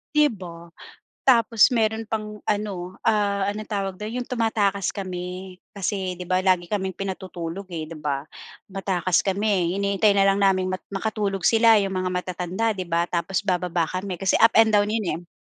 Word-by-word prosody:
Di 300 0 +6
ba? 175 -8 -8 0.6
Tapos 230 -2 +5
meron 220 0 +1
pang 210 -1 -4
ano, 195 -3 -3
ah, 200 -2 +2
anong 210 +1 -6
tawag 195 -3 -2
do'n, 215 +2 -5
'yung 245 - -4
tumatakas 215 -6 0
kami, 185 -1 -6 0.2
kasi 190 -2 -2
di 180 - -5
ba, 185 +1 +2
lagi 185 -2 +2
kaming 190 -3 -2
pinatutulog, 190 -1 -5
eh, 165 -2 -4
di 165 - -9
ba? 140 -2 -2 0.4
Tumatakas 190 -2 0
kami, 195 -3 +1
hinihintay 200 +1 +3
na 195 - +5
lang 195 0 +3
naming 185 -1 +2
mat 185 - -4
makatulog 200 -1 -2
sila, 225 -1 +6
'yung 195 -1 -2
mga 185 0 -1
matatanda 180 +4 -2
di 185 - -4
ba, 170 0 +1
tapos 175 +2 -1
bababa 180 -2 0
kami. 185 -1 -4
Kasi 195 - +1
up 225 0 +5
and 225 -1 +6
down 205 0 +4
'yun, 215 -2 -1 0.2
eh. - - -21
195 Hz, 175 wpm, -24 LUFS, 180-210 Hz, 0.6 s, Di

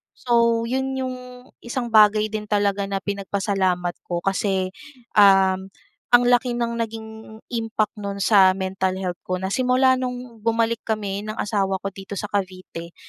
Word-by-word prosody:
So 235 -2 +2
'yon 265 +1 -1
'yong 260 -1 -3 0.5
isang 240 0 -3
bagay 215 0 +5
din 215 -1 -4
talaga 205 -1 +1
na 195 -1 -3
pinagpasalamat 195 -3 -1
ko 175 -1 -2
kasi, 195 -1 0 0.5
um, 190 -2 +5 0.5
ang 245 0 +8
laki 245 0 +3
ng 235 -1 -2
naging 225 -1 -4 0.4
impact 225 -2 -1
no'n 200 -1 -5
sa 190 -3 +6
mental 190 0 -2
health 180 -2 -3
ko. 185 - 0
Na 190 - -2
simula 255 +2 +3
nung 250 -2 -5
bumalik 230 +1 0
kami 205 -2 -2
ng 215 0 -5
asawa 195 -4 -1
ko 195 - -1
dito 195 +1 -8
sa 205 +2 -4
Cavite 185 -3 -4
205 Hz, 150 wpm, -23 LUFS, 195-235 Hz, 0.5 s, ang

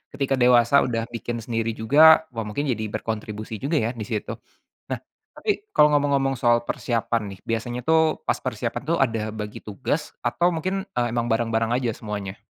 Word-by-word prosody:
ketika 135 -1 0
dewasa 125 +2 +5
udah 115 -2 -1
bikin 115 -1 -4
sendiri 115 -1 -2
juga 155 +8 +6
wah 115 -2 -4
mungkin 105 +7 -2
jadi 110 -2 -2
berkontribusi 110 0 -5
juga 145 +5 -1
ya 115 - 0
di 110 -4 -6
situ, 105 -2 -3 0.6
nah - - -1 0.4
tapi 415 -2 -1
kalau 150 - +6
ngomong-ngomong 140 -2 +2
soal 120 -1 +3
persiapan 115 -1 -1
nih 95 - -11
biasanya 115 +2 -2
tuh 160 -1 +3
pas - - +2
persiapan - - -3
tuh 170 - +2
ada 115 -4 +1 0.2
bagi 105 0 -5
tugas 130 +8 -3
atau 170 +9 +1
mungkin, 190 +4 -2 0.2
eee, 120 - +2
emang 120 -1 0
bareng-bareng 115 0 +1
aja 115 -3 -2
semuanya? 105 -2 -5
120 Hz, 175 wpm, -24 LUFS, 110-140 Hz, 0.6 s, juga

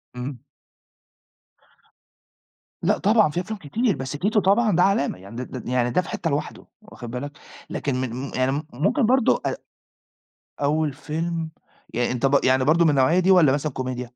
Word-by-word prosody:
إمم. 125 0 -6 2.4
لأ - - +2
طبعًا 210 -4 +4
في 170 - -2
أفلام 215 +2 -6
كتير، 210 - 0
بس 130 0 -5
تيتو 205 +9 +1
طبعًا 205 +1 +3
ده 180 - +4
علامة، 190 - +1
يعني 100 +4 -12
د 125 - -4 0.2
د 120 - -7
يعني 125 -1 +1
ده 180 - +2
في 165 - -10
حِتّة 165 - -2
لوحده، 145 +1 -4 0.2
واخُد 120 - -10
بالك، 140 +4 -5 0.4
لكن 140 -3 -2
من 130 -2 -2
م 130 +2 -5
يعني 130 +1 +1
م 145 +3 -2
ممكن 200 - +1
برضه 255 0 +3
أ - - 0 1.1
أول 150 0 +1
فيلم 160 +2 -3 0.4
يعني 120 +1 0
أنت 125 +1 -1
بر 140 0 +4
يعني 130 0 +3
برضه 165 +3 +4
من - - +5
النوعية 140 +6 +3
دي 185 +1 +3
والّا 165 -7 +6
مثلًا 145 +1 -1
كوميديا؟ 125 -1 -4
145 Hz, 180 wpm, -23 LUFS, 130-180 Hz, 2.4 s, والّا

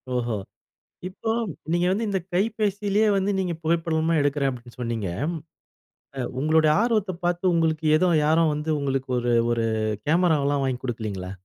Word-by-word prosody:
ஓஹோ! 120 -2 -1 0.7
இப்போ 220 +4 -4 0.4
நீங்க 175 +1 +2
வந்து 215 +4 0
இந்த 195 -2 0
கைபேசியிலயே 210 +1 +1
வந்து 195 +1 +1
நீங்க 180 -2 -1
புகைப்படமா 165 0 +1
எடுக்கிறேன் 140 -1 +1
அப்டின்னு 120 -1 -11
சொன்னீங்க. 115 -5 -2 1.1
அ - - -3 0.2
உங்களுடைய 155 +1 +3
ஆர்வத்த 215 -5 +1
பார்த்து, 175 +1 0
உங்களுக்கு 160 -1 +1
ஏதோ 180 +3 +2 0.2
யாரும் 160 +1 +3
வந்து, 150 +2 -4
உங்களுக்கு 135 -2 -2
ஒரு 120 0 -1 0.2
ஒரு 115 -1 0 0.4
கேமராவல்லாம் 150 -4 +2
வாங்கிக் 130 -2 -2
குடுக்கலைங்களா? 105 -6 -4
160 Hz, 135 wpm, -24 LUFS, 130-185 Hz, 1.1 s, உங்களுடைய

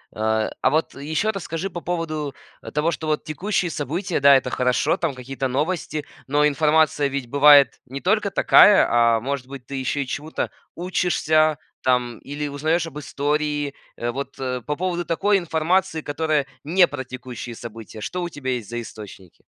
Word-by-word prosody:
Э, 110 0 0
а - - +4
вот 155 +4 0
еще 155 +9 -1
расскажи 190 -2 -4
по 175 -1 -6
поводу, 155 -5 -3 0.4
того, 150 +3 +1
что 160 0 -5
вот 155 -1 0
текущие 180 +3 -1
события 170 +6 -2
да, 140 0 +7
это 130 - +1
хорошо, 125 +6 +1
там 170 -5 -1
какие-то 135 +1 -4
новости, 150 +2 -2 0.2
но 145 +2 +3
информация 150 0 +3
ведь 135 -3 -4
бывает 145 0 +6
не 135 +2 -7
только 205 +1 +1
такая, 205 +1 +6
а 115 -1 +4
может 130 +1 -4
быть 135 -2 -9
ты 140 - -7
еще 135 +2 -1
и - - -11
чему-то 150 +5 -4 0.2
учишься, 155 -3 +1 0.3
там, 125 -2 +1
или 145 +1 -5
узнаешь 155 +4 0
об 150 - -9
истории, 145 0 -1 0.2
вот 120 +4 -4
по 130 +2 -3
поводу 175 +1 -2
такой 200 +5 +2
информации, 170 0 0
которая 150 -1 0 0.2
не 175 +4 +4
про 140 -3 -5
текущие 125 -2 -8
события. 115 -1 -9
Что 180 +10 -3
у 175 - -3
тебя 140 -5 -4
есть 120 -5 -5
за 120 0 -3
источники? 100 -5 -12
145 Hz, 165 wpm, -23 LUFS, 130-160 Hz, 0.4 s, да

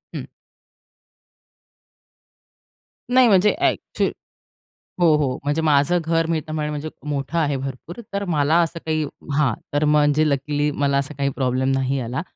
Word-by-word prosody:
हं. - - -5 2.9
नाही 255 -1 +6
म्हणजे 205 -1 +4
ॲक 350 -1 +2 0.2
चु - - +3 1.0
हो 165 -3 +5
हो, 135 -4 0
म्हणजे 145 +3 0
माझं 155 +3 +3
घर 165 0 +1
मी 165 -1 +1
आता 155 0 -7
म्हणेन 150 -1 -2
म्हणजे 150 +1 -4 0.2
मोठं 145 +3 -2
आहे 145 -3 +1
भरपूर. 135 - -7
तर 200 0 -1
मला 155 -3 +1
असं 165 0 -2
काही 155 -1 0 0.3
हां, 135 -7 +3 0.2
तर 145 +1 +2
म्हणजे 150 +1 +3
लकीली 145 +1 0
मला 140 -1 0
असा 140 +2 -2
काही 140 0 0
प्रॉब्लेम 130 0 0
नाही 135 0 0
आला. 125 +5 -3
150 Hz, 150 wpm, -22 LUFS, 140-165 Hz, 2.9 s, नाही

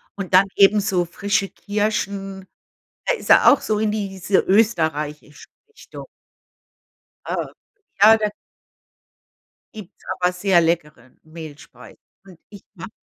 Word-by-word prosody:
Und 195 -2 -7
dann 185 +2 +6
eben 200 +1 +5
so 190 -4 -1
frische 200 +4 -2
Kirschen, 200 -2 -4 0.6
da - - +1
ist - - -10
er - - +7
auch - - +2
so 215 - -2
in 215 -1 0
diese 195 -2 -2
österreichische 160 -8 -1 0.2
Richtung. 435 - -13 1.2
Äh, - - -3 0.7
ja, 220 +1 +8
da 215 -1 -1 1.4
gibt's 210 -5 -13 0.2
aber 180 0 +2
sehr 180 -1 +2
leckere 150 -7 -3
Mehlspeisen. 155 -2 -13 0.2
Und 185 -4 -17
ich 205 -2 -14
mache 190 +2 -9
195 Hz, 120 wpm, -20 LUFS, 170-210 Hz, 1.4 s, ja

